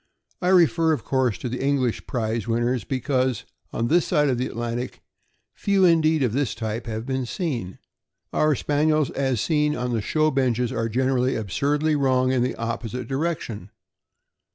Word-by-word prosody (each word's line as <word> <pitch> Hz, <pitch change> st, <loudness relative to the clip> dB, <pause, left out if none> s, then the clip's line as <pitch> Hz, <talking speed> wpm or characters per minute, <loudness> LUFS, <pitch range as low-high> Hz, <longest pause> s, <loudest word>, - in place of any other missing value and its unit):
I 180 Hz, -, 0 dB
refer, 165 Hz, -3 st, +4 dB
of 150 Hz, -, -3 dB
course, 130 Hz, -5 st, 0 dB
to -, -, -5 dB
the 125 Hz, +2 st, -4 dB
English 135 Hz, -4 st, 0 dB
prize 115 Hz, -3 st, -2 dB
winners, 120 Hz, 0 st, 0 dB
because, 130 Hz, -1 st, -1 dB, 0.3 s
on 115 Hz, -, -1 dB
this 170 Hz, +5 st, +3 dB
side 150 Hz, -1 st, +2 dB
of 125 Hz, -2 st, 0 dB
the 125 Hz, -, 0 dB
Atlantic, 120 Hz, +2 st, -4 dB, 0.5 s
few 200 Hz, -2 st, +2 dB
indeed 160 Hz, -3 st, +4 dB
of 120 Hz, -4 st, 0 dB
this 140 Hz, -2 st, 0 dB
type 115 Hz, +1 st, -4 dB
have 110 Hz, 0 st, -4 dB
been 130 Hz, -1 st, -2 dB
seen.* 120 Hz, -, -3 dB, 0.6 s
Our 155 Hz, -1 st, +3 dB
Spaniels, 150 Hz, +1 st, +1 dB
as 135 Hz, -4 st, 0 dB
seen 150 Hz, -2 st, +1 dB
on 125 Hz, 0 st, -2 dB
the 115 Hz, -, 0 dB
show 155 Hz, +8 st, +1 dB
benches, 125 Hz, -3 st, +1 dB
are 115 Hz, 0 st, -1 dB
generally 130 Hz, +2 st, +1 dB
absurdly 145 Hz, -, 0 dB
wrong 130 Hz, -2 st, +2 dB
in 130 Hz, -2 st, +1 dB
the 125 Hz, -, 0 dB
opposite 115 Hz, +1 st, -4 dB
direction. 135 Hz, -, -3 dB
130 Hz, 165 wpm, -24 LUFS, 120-150 Hz, 0.6 s, refer